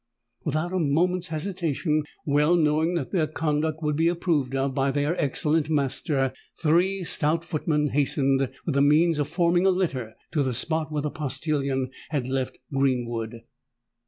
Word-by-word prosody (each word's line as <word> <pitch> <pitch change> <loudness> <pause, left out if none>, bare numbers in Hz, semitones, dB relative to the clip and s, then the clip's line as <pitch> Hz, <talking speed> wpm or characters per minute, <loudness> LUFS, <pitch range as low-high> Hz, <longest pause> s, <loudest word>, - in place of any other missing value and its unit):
Without 155 +4 -1
a 185 - +1
moment's 175 +4 +1
hesitation,—well 155 -2 0
knowing 160 +1 +2
that 145 -7 -2
their 165 -5 +1
conduct 155 +1 -1
would 150 -1 +1
be 165 +2 +2
approved 165 -6 0
of 135 0 0
by 135 0 +1
their 145 +4 0
excellent 150 +2 +1
master,—three 150 +6 0
stout 165 0 0
footmen 150 -2 0
hastened, 135 -2 +1 0.2
with 160 - 0
the 140 - +3
means 155 +3 +4
of 145 - 0
forming 175 +3 +2
a - - +6
litter, 135 -12 -1 0.2
to 150 - +1
the 130 -3 0
spot 160 +4 -1
where 150 -1 -1
the 150 - -2
postillion 140 -3 -2 0.2
had 140 -5 -1
left 130 -1 -2 0.2
Greenwood. 120 -4 -1
150 Hz, 150 wpm, -25 LUFS, 135-165 Hz, 0.2 s, a